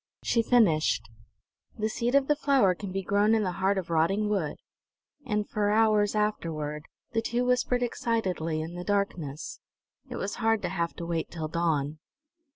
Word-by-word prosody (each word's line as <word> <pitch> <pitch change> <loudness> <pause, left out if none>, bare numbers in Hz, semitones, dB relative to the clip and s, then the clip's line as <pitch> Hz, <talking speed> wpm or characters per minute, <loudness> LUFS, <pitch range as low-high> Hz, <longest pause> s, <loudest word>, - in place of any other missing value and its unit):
She 230 - +2
finished: 160 - +3 0.7
"The 215 -1 0
seed 235 +4 -1
of 275 -1 +4
the 295 - +3
flower 275 -10 +3
can 195 +1 -7
be 195 +1 -2
grown 205 +4 +3
in 220 - +2
the 185 - 0
heart 195 +1 +2
of 180 -3 -3
rotting 195 +6 +2
wood!" 185 -8 -1 0.7
And 210 -2 0
for 205 -1 0
hours 215 -1 +3
afterward 155 -8 -2 0.3
the 225 - +1
two 240 +2 -1
whispered 250 0 +2
excitedly 185 -10 -1
in 160 +2 -6
the 175 0 -6
darkness. 180 - -2 0.5
It - - -5
was 200 - -3
hard 225 -1 +2
to - - -1
have 170 -2 -2
to 170 - -6
wait 170 -1 -2
till 160 -2 -5
dawn. 155 -3 0
200 Hz, 170 wpm, -28 LUFS, 165-225 Hz, 0.7 s, of